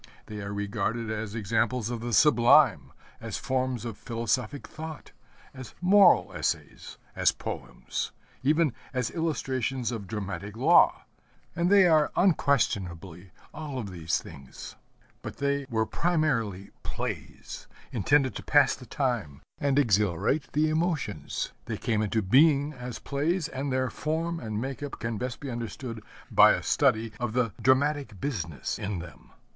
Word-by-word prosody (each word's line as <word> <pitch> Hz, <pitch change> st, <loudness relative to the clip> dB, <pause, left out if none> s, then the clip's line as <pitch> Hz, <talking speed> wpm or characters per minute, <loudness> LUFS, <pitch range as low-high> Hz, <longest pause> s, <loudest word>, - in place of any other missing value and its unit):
They 105 Hz, -1 st, -7 dB
are 100 Hz, 0 st, -5 dB
regarded 105 Hz, +3 st, -2 dB
as 110 Hz, -1 st, -4 dB
examples 115 Hz, +2 st, 0 dB
of 120 Hz, -, -3 dB
the 120 Hz, +1 st, -4 dB
sublime, 120 Hz, -1 st, +5 dB, 0.3 s
as -, -, -5 dB
forms 130 Hz, -2 st, -1 dB
of 115 Hz, -3 st, -6 dB
philosophic 120 Hz, +4 st, -2 dB
thought, 155 Hz, -1 st, -8 dB, 0.4 s
as 130 Hz, -3 st, -10 dB
moral 190 Hz, +1 st, +5 dB
essays, -, -, -3 dB, 0.2 s
as -, -, +3 dB
poems, -, -, -5 dB, 0.3 s
even 150 Hz, 0 st, +2 dB, 0.2 s
as 125 Hz, -3 st, -1 dB
illustrations 135 Hz, -6 st, -1 dB
of 110 Hz, -5 st, -5 dB
dramatic 100 Hz, 0 st, -5 dB
law, 125 Hz, -, +5 dB, 0.5 s
and 170 Hz, +1 st, +1 dB
they 200 Hz, -2 st, +7 dB
are 155 Hz, -3 st, +4 dB
unquestionably 95 Hz, -, 0 dB, 0.2 s
all 150 Hz, -3 st, -6 dB
of 105 Hz, -6 st, -5 dB
these 85 Hz, -2 st, -1 dB
things. 65 Hz, -1 st, -11 dB, 0.5 s
But -, -, -7 dB
they 140 Hz, -1 st, -1 dB
were 110 Hz, -2 st, +1 dB
primarily 115 Hz, -, 0 dB
plays -, -, -6 dB, 0.2 s
intended 130 Hz, +3 st, +2 dB
to -, -, -8 dB
pass -, -, +4 dB
the -, -, -13 dB
time 110 Hz, -, -2 dB, 0.2 s
and 140 Hz, -1 st, +1 dB
exhilarate 105 Hz, -, +2 dB
the 155 Hz, +1 st, +3 dB
emotions. 155 Hz, -, -2 dB
They -, -, -4 dB
came 110 Hz, -2 st, 0 dB
into 110 Hz, +1 st, 0 dB
being 145 Hz, -, +4 dB
as 125 Hz, -3 st, -7 dB
plays, 155 Hz, +4 st, -1 dB
and 135 Hz, 0 st, -3 dB
their 130 Hz, 0 st, 0 dB
form 165 Hz, +2 st, -2 dB
and 110 Hz, -4 st, -4 dB
make 135 Hz, +3 st, -4 dB
up 145 Hz, -1 st, -6 dB
can 115 Hz, -2 st, -3 dB
best 125 Hz, -2 st, -4 dB
be 140 Hz, -2 st, -6 dB
understood 115 Hz, 0 st, -6 dB, 0.3 s
by -, -, +7 dB
a -, -, -3 dB
study 110 Hz, 0 st, +2 dB
of 120 Hz, -3 st, -2 dB
the 120 Hz, -4 st, +1 dB
dramatic 130 Hz, -5 st, +2 dB
business 85 Hz, -, -3 dB
in 105 Hz, -1 st, -3 dB
them. 85 Hz, +1 st, -10 dB
125 Hz, 145 wpm, -28 LUFS, 105-145 Hz, 0.5 s, they